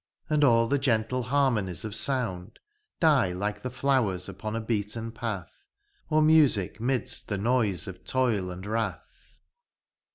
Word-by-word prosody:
And 150 -1 +3
an 115 -4 +4
the 140 - +2
gentle 125 -1 0
harmonies 115 - 0
of 105 - -5
sounds 115 -6 0 0.5
Die 140 - +3
like 105 +3 -3
the 130 - -4
flowers 125 -8 0
upon 100 +3 -5
a - - -1
beaten 110 0 -2
path. 110 -6 -5 0.6
Or 155 0 +3
music 145 - +4
midst 125 -1 -1
the 105 - -2
noise 105 -5 0
of 95 -1 -9
toil 115 -8 0
and 90 +1 -7
wrath. 110 +1 -5
115 Hz, 140 wpm, -27 LUFS, 100-130 Hz, 0.6 s, an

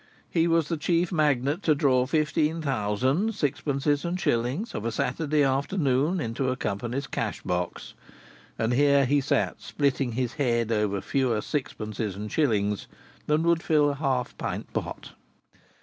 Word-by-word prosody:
He 165 -1 +2
was 165 -2 +2
the 165 - -1
chief 170 +3 +1
magnet 150 0 +1
to 155 -5 +3
draw 130 -3 +2
fifteen 155 +2 +1
thousand 135 - 0
sixpences 145 -2 0
and 175 +1 -2
shillings 125 - 0
of - - -4
a 115 - -1
Saturday 145 +6 0
afternoon 140 +3 +1
into 130 0 -1
a 130 - 0
company's 120 +4 -3
cash - - -3
box, 90 -1 -3 0.6
and 115 +2 0
here 140 +1 +4
he 140 +3 +2
sat 135 - 0
splitting 135 -4 0
his 125 0 -1
head 120 -3 +1
over 105 -3 0
fewer 130 -5 0
sixpences 110 -6 -3
and 105 +2 -6
shillings 105 -9 +1 0.4
than 150 +2 +2
would 170 -1 +3
fill 150 -3 +3
a - - -3
half 135 -4 -1
pint - - -4
pot! - - -4
140 Hz, 150 wpm, -26 LUFS, 120-155 Hz, 0.6 s, here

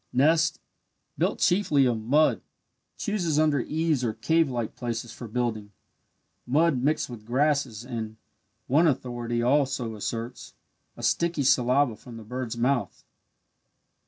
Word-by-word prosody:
Nest 160 +4 +3 0.6
built - - 0
chiefly 165 -7 +3
of 120 -3 0
mud 145 +8 +3 0.6
chooses 180 -8 -1
under 155 -2 +3
eaves 155 +1 0
or 115 -3 0
cavelike 125 -2 0
places 120 -1 -4
for 120 - -8
building 110 -3 -3 0.7
mud 150 0 +2
mixed 150 +4 +1
with 120 -4 -9
grasses 130 -2 0
and 110 -3 -5 0.5
(one 155 +6 +4
authority 120 -4 -1
also 130 -3 +1
asserts) 115 +4 -5 0.4
a - - -9
sticky 170 -4 +1
saliva 130 -1 +3
from 120 +1 -12
the 110 - -9
bird's 125 +1 -5
mouth. 125 +1 -1
125 Hz, 125 wpm, -26 LUFS, 120-150 Hz, 0.7 s, one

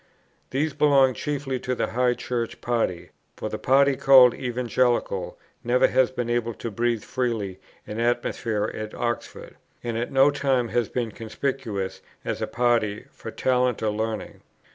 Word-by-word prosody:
These 145 +3 -1
belonged 135 -4 +4
chiefly 140 -3 -3
to 125 +1 -2
the - - -2
High 125 0 +2
Church 120 -2 -3
party; 115 -8 -1 0.3
for - - -4
the - - -5
party 140 +1 +4
called 130 -2 +7
Evangelical 120 -5 -1 0.3
never 125 +1 +3
has 130 -1 +3
been 125 -2 -3
able 120 -1 -1
to 115 - -5
breathe 115 0 0
freely 110 -7 -2 0.3
in 105 - -6
the 115 - 0
atmosphere 115 -3 0
of 110 0 -5
Oxford, 120 -1 -4 0.3
and 115 -1 -2
at 120 - -3
no 135 +2 +5
time 135 -4 0
has 120 -1 0
been 120 -3 -2
conspicuous, 110 -3 -4 0.2
as - - -3
a - - -1
party, 120 -4 +1
for - - -9
talent 125 -3 +1
or 110 - +1
learning. 110 0 -4
120 Hz, 160 wpm, -25 LUFS, 115-130 Hz, 0.3 s, called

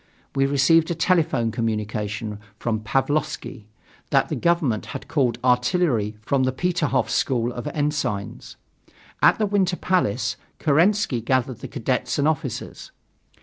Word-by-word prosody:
We 135 0 +2
received 150 +4 +4
a 170 - -1
telephone 160 -9 +1
communication 105 -1 -3 0.2
from 115 -2 -1
Pavlovsky 135 0 -2 0.4
that - - +2
the - - -1
government 165 - +1
had - - -15
called 125 -6 +1
artillery 125 - +2
from 135 +4 +1
the 130 0 +2
Peterhof 170 +2 0
School 120 -2 0
of 120 - -6
Ensigns. 145 - -3 0.7
At - - +6
the 215 - +1
Winter 195 -3 +1
Palace, 115 - 0 0.2
Kerensky 165 - +2
gathered 130 0 0
the - - -7
cadets 130 -2 -2
and 145 0 +2
officers. 155 -2 -3
135 Hz, 130 wpm, -23 LUFS, 115-160 Hz, 0.7 s, At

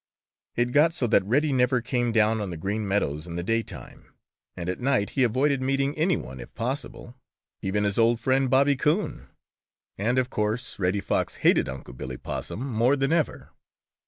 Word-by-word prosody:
It 120 +1 +1
got 155 +5 +4
so 130 - 0
that 110 - +3
Reddy 140 +7 +2
never 125 0 +3
came 120 0 -1
down 110 0 +2
on 100 - -3
the 85 - -5
Green 100 +5 -2
Meadows 80 -6 -1
in 85 - -6
the 85 - -3
daytime, 115 +4 -4 0.5
and 85 - -5
at 90 - -2
night 125 -5 +1
he 135 - -1
avoided 130 +3 +2
meeting 135 +2 0
any 165 +3 +2
one 65 +1 -8
if - - -10
possible, 125 0 -4 0.5
even 105 +2 0
his 100 +1 0
old 115 0 +4
friend, 130 +2 +2
Bobby 140 +2 +4
Coon. 160 +9 -1 0.7
And 120 +5 +1
of 130 0 +1
course 110 +3 -2
Reddy 95 +2 +1
Fox - - -1
hated - - +4
Unc' 65 -2 -8
Billy 65 0 -6
Possum 130 - -5
more 120 +2 +2
than 135 +2 +1
ever. 165 -3 -1
120 Hz, 185 wpm, -26 LUFS, 100-135 Hz, 0.7 s, got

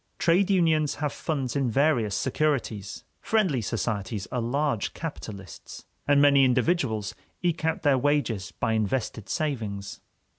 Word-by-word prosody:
Trade 180 +4 +3
unions 160 -6 +2
have 150 -1 -2
funds 135 -6 -3
in 135 -3 +1
various 120 -5 +2
securities; 125 -8 -1 0.2
friendly 190 - +1
societies 105 -2 -2
are 125 -1 -1
large 130 -1 -1
capitalists; 105 - -8 0.2
and 145 0 +5
many 140 -1 +6
individuals 125 - +1 0.3
eke 170 -2 0
out 160 - 0
their 140 -3 +4
wages 125 -8 0
by 115 - -1
invested 110 0 -2
savings. 110 -10 -3
135 Hz, 125 wpm, -26 LUFS, 110-155 Hz, 0.3 s, many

